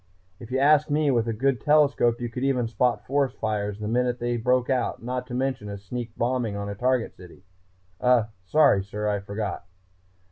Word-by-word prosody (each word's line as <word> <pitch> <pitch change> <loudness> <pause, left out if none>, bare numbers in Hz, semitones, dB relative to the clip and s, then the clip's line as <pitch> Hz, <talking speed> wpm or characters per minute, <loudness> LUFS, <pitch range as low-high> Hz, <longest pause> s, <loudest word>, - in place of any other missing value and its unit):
If 115 - -10
you 130 - -1
ask 150 +2 +4
me, 145 -1 +2
with 120 -2 +1
a - - 0
good 125 +1 0
telescope 140 -6 +3
you 120 - -3
could 125 +2 -5
even 130 -4 +1
spot 120 +2 0
forest 135 -1 0
fires 105 -2 -2
the 105 0 -5
minute 125 +2 0
they 120 0 -2
broke 125 +1 +1
out, 130 -3 -1
not 125 +1 -3
to 125 - -5
mention 130 -5 -2
a 100 - -5
sneak 120 +4 -6
bombing 120 -3 -1
on 100 0 -4
a - - -3
target 125 +3 0
city 90 0 -15 0.6
uh, 125 -2 +4 0.2
sorry, 120 -3 +4
sir, 105 +2 -4
I 105 -1 0
forgot." 100 -2 -5
120 Hz, 200 wpm, -25 LUFS, 105-130 Hz, 0.6 s, ask